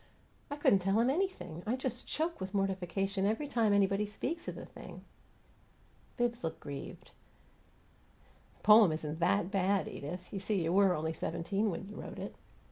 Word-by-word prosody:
"I 285 - -3
couldn't 245 -9 +4
tell 195 +3 +2
'em 240 +3 +4
anything! 270 - -2
I 235 - +2
just 255 -1 -4
choke 320 - -2
with 190 +2 -4
mortification 195 0 0
every 225 +8 0
time 230 -6 +2
anybody 200 +1 +3
speaks 295 +11 -4
of - - -3
the - - -7
thing." - - -11 1.1
Bibbs 240 -2 0
looked 160 -1 -3
grieved. 140 -2 -8 1.5
"The - - -28
poem 210 -4 +8
isn't 155 0 -4
THAT 180 +2 +2
bad, 195 0 +2
Edith. 180 +7 -7
You 195 - -2
see, 195 -2 0
you 165 +1 0
were 195 -2 +5
only 160 +1 -2
seventeen 170 +7 -1
when 195 +1 -4
you 210 - -9
wrote - - -8
it." - - -6
195 Hz, 170 wpm, -33 LUFS, 180-220 Hz, 1.5 s, poem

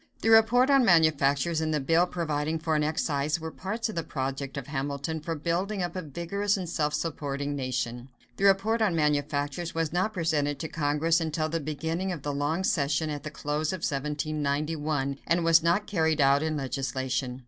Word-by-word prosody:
The 225 - +2
report 235 +4 +6
on 275 -2 +6
manufactures 160 - +3
and 160 0 -1
the 155 - +1
bill 165 +6 +3
providing 155 -2 -2
for 160 0 -1
an 150 - +2
excise 150 0 0
were 160 0 -6
parts 215 +7 -3
of 220 - -5
the 170 - -1
project 135 -2 -4
of 140 - -4
Hamilton 145 +2 -3
for 165 +2 -4
building 180 +6 -1
up 175 0 -4
a 185 - -2
vigorous 180 +6 -1
and 185 -2 -4
self 150 -3 0
supporting 145 -3 -3
nation. 125 -2 -3 0.3
The 200 - +1
report 200 +4 +3
on 200 -6 +2
manufactures 150 +1 -1
was 165 -1 -1
not 185 +5 +1
presented 155 -6 0
to 160 - -4
Congress 155 +2 +1
until 155 0 -1
the 165 +1 -1
beginning 160 +5 -3
of 160 -6 -6
the 145 - -2
long 145 +6 -1
session 155 -2 +1
at 145 -1 -4
the 155 - -6
close 150 0 -2
of 185 -3 -5
1791, 145 0 -2
and 170 0 +2
was 165 0 +6
not 170 +5 +2
carried 160 -5 +1
out 140 0 +4
in 155 -1 -1
legislation. 130 -1 -2
155 Hz, 190 wpm, -28 LUFS, 145-170 Hz, 0.3 s, report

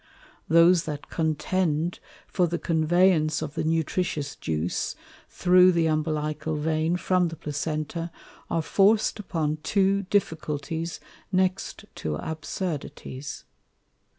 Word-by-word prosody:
Those 170 +1 +6
that 150 -2 -6
contend 165 +1 0 0.3
for 180 -2 +1
the 170 +1 -2
conveyance 165 -1 +2
of 145 - -5
the - - -2
Nutricious 160 -2 -1
Juice, 80 +2 -2 0.3
through 180 0 +5
the 170 -1 +2
Umbilical 155 0 -1
Vein 160 +3 0
from 180 0 +2
the 165 - -6
Placenta, 155 +2 -3 0.4
are 165 - 0
forc'd 210 +5 +3
upon 160 -6 -1
two 195 +2 +2
Difficulties 160 -3 -1 0.3
next 185 0 0
to 75 -1 -2
Absurdities. 155 - -5
160 Hz, 105 wpm, -26 LUFS, 155-180 Hz, 0.4 s, Those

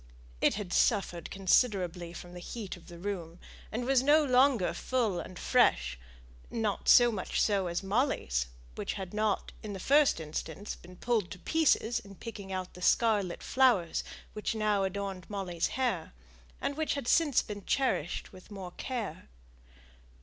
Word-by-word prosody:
It - - +4
had 200 -3 -4
suffered 190 -6 +1
considerably 185 -3 +1
from 175 0 -10
the 180 - -8
heat 205 +2 -6
of 175 - -16
the 170 - -10
room, 175 -3 -5 0.3
and 240 +2 -2
was 265 -1 +4
no 295 +3 +5
longer 250 - +4
full 220 -1 0
and 185 - -8
fresh; - - +2 0.5
not 220 -3 -1
so 240 -1 +8
much 195 -4 -2
so 200 -3 +2
as 170 +2 -2
Molly's, 190 - 0 0.3
which - - -3
had 190 -1 -6
not, 210 -1 0
in 210 -2 -6
the 195 - -6
first 285 - +4
instance, 160 +5 -5
been 180 +1 -14
pulled 220 -4 0
to - - -7
pieces 255 - +2
in 195 0 -13
picking 200 -2 -8
out 185 -1 -4
the 180 - -12
scarlet 205 -3 +2
flowers 240 -11 +3 0.3
which 215 +2 -2
now 210 -2 +2
adorned 195 -1 -3
Molly's 185 -5 -1
hair, 240 - -1 0.5
and 285 - -2
which 315 -1 0
had 280 -4 -4
since 300 -4 +4
been 205 -1 -7
cherished 255 - -1
with 185 -1 -14
more 190 -4 -7
care. 230 - -5
200 Hz, 160 wpm, -31 LUFS, 180-240 Hz, 0.5 s, so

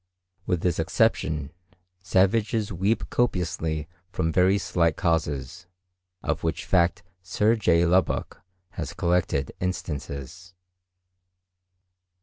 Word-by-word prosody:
With 90 -2 0
this 90 -2 0
exception, 80 - +1 0.5
savages 100 +3 +1
weep 100 +6 0
copiously 80 -9 -1 0.2
from 80 -2 -1
very 95 +3 +4
slight 85 -3 +1
causes, 80 -1 -1 0.6
of - - -1
which 80 0 -2
fact 85 -2 +2 0.2
Sir 105 +5 +2
J. 85 -6 +3
Lubbock 90 +2 +1 0.3
has - - -6
collected 85 -6 0
instances. 90 0 -5
90 Hz, 95 wpm, -26 LUFS, 80-95 Hz, 0.6 s, very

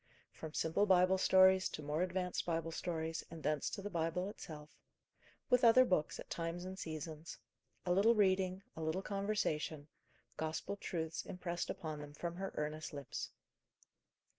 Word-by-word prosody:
From 160 -1 -8
simple 165 +6 +2
Bible 185 0 +5
stories 190 0 +6
to 155 - -6
more 150 +3 -1
advanced 180 0 -1
Bible 165 -1 -1
stories, 165 -1 -2
and 160 -2 -9
thence 150 -1 +1
to 200 - -5
the 205 - -3
Bible 170 +3 0
itself; 150 -7 -8 0.8
with 250 0 +4
other 245 +2 +8
books 170 -8 +1
at - - -7
times 170 +1 -3
and 190 +1 -6
seasons: 160 -1 -6 0.5
a 175 - +3
little 215 +5 +5
reading, 190 -2 +2
a 160 - -6
little 160 +4 -1
conversation, 190 -8 -1 0.5
Gospel 160 +5 -2
truths 160 -5 -3
impressed 175 -1 -3
upon 155 -2 -4
them 145 0 -9
from 170 +2 -4
her 195 0 -3
earnest 150 +1 -3
lips. 140 -3 -5
170 Hz, 155 wpm, -37 LUFS, 155-190 Hz, 0.8 s, other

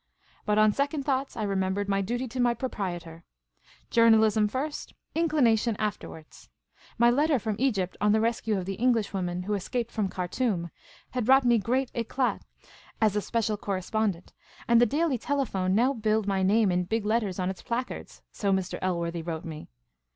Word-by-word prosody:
But 210 0 +2
on 215 -1 +5
second 280 +2 -1
thoughts, 270 -1 -1
I 220 - -2
remembered 195 0 -1
my 195 0 +1
duty 240 +6 -2
to 255 +3 -6
my 240 -1 +3
proprietor. 175 -9 -5 0.7
Journalism 220 -2 +5
first; 270 +7 -4 0.2
inclination 245 -9 +2
afterwards! 200 -7 -6 0.5
My 235 +1 +5
letter 290 +3 +3
from 215 -2 -2
Kgypt 210 -8 0
on 210 0 +4
the 220 - +3
rescue 225 -2 0
of 185 - -3
the 195 - -3
English 235 -5 +2
woman 180 -2 -2
who 210 +3 -2
escaped 235 +4 -2
from 210 -4 -1
Khartoum 180 -1 -2 0.4
had 250 -2 -1
brought 265 +1 +5
me 240 -1 +4
great 255 +4 -1
tWa/ 245 +2 -1 0.6
as 215 -3 +2
a 210 - +1
special 220 -1 -1
corre 195 -2 -3
spondent, 200 -3 -2 0.4
and 235 -1 +5
the 240 - +5
Daily 290 0 0
Tclcp1i07ie 225 -10 -1
now 240 +7 +3
billed 220 -3 0
my 195 -1 0
name 200 +1 +3
in 180 0 0
big 220 +3 -2
letters 215 -4 0
on 185 0 -1
its 190 - -10
placards, 245 +2 -5
so 200 -2 -1
Mr. 190 -1 -1
Elworthy 170 -2 -1
wrote 160 -1 -5
me. 155 -2 -8
215 Hz, 175 wpm, -27 LUFS, 190-240 Hz, 0.7 s, on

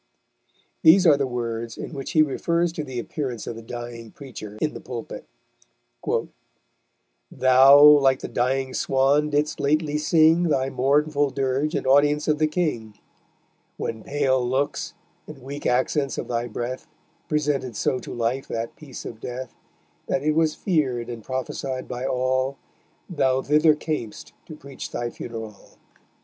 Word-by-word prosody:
These 180 +4 +7
are 155 -4 +7
the 140 -1 -1
words 115 -2 -4
in - - -7
which 135 -2 -6
he 155 - +6
refers 170 +4 0
to 155 - -4
the 130 -3 -7
appearance 125 -1 -4
of 115 - -5
the 115 - -8
dying 120 0 -8
preacher 110 -5 -10
in 155 - -1
the - - -8
pulpit: 120 -3 -7 2.0
_Thou 140 +3 +7
(like 135 -1 +3
the - - -4
dying 130 +1 -1
Swan) 140 +4 +2
didst 150 +1 0
lately 150 +1 +1
sing 160 +2 +4
Thy 135 -2 0
mournful 145 +2 +2
dirge 135 +3 -1
in - - -2
audience 145 +2 +3
of 155 -1 +1
the 155 - +3
King; 135 -10 -2 0.8
When 110 -1 -4
pale 135 -3 +1
looks, 130 +3 -2 0.3
and 155 -2 -10
weak 140 +2 -5
accents 130 +2 0
of - - -4
thy 120 0 -2
breath 120 +3 -5 0.4
Presented 145 -5 -1
so 130 - 0
to - - -9
life 120 +3 -2
that 115 0 -4
piece 140 -5 -10
of 110 - -8
death, 125 +1 -6 0.5
That 135 - -1
it 155 - +2
was 155 0 +1
feared 130 - -1
and 115 -2 -7
prophesied 130 +1 -4
by 125 +1 -4
all 130 +1 0 0.5
Thou 135 -7 +1
thither 150 +1 +4
cam'st 150 -8 -5
to 155 - -9
preach 140 -2 -9
thy 120 0 -4
funeral_. 110 -3 -9
135 Hz, 150 wpm, -24 LUFS, 125-150 Hz, 2.0 s, These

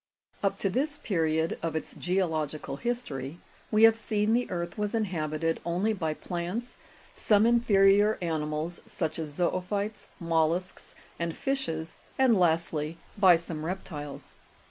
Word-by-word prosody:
33. 200 - +3
Up 195 - -2
to 200 - 0
this 290 +7 0
period 160 - 0
of 165 -1 -2
its 160 - -4
geological 155 -6 -1
history, 155 - -3 0.3
we 215 +1 +3
have 225 0 +8
seen 215 -1 0
the 245 +1 +1
earth 170 -1 -3
was 210 +1 -2
inhabited 165 -6 -1
only 180 +6 0
by 165 -6 -1
plants, 180 +10 -4 0.4
some 210 0 +3
inferior 210 -3 +5
animals, 160 0 -2
such 160 -1 -2
as 155 -2 -3
zo'ophytes, 200 +4 -1
mollusks 170 +2 -1 0.2
and 170 -1 -2
fishes, 165 -13 -2 0.2
and 260 -3 +5
lastly, 165 -2 +1 0.2
by 190 -4 +7
some 165 -2 -5
reptiles. 150 -6 -6
175 Hz, 135 wpm, -28 LUFS, 160-210 Hz, 0.4 s, have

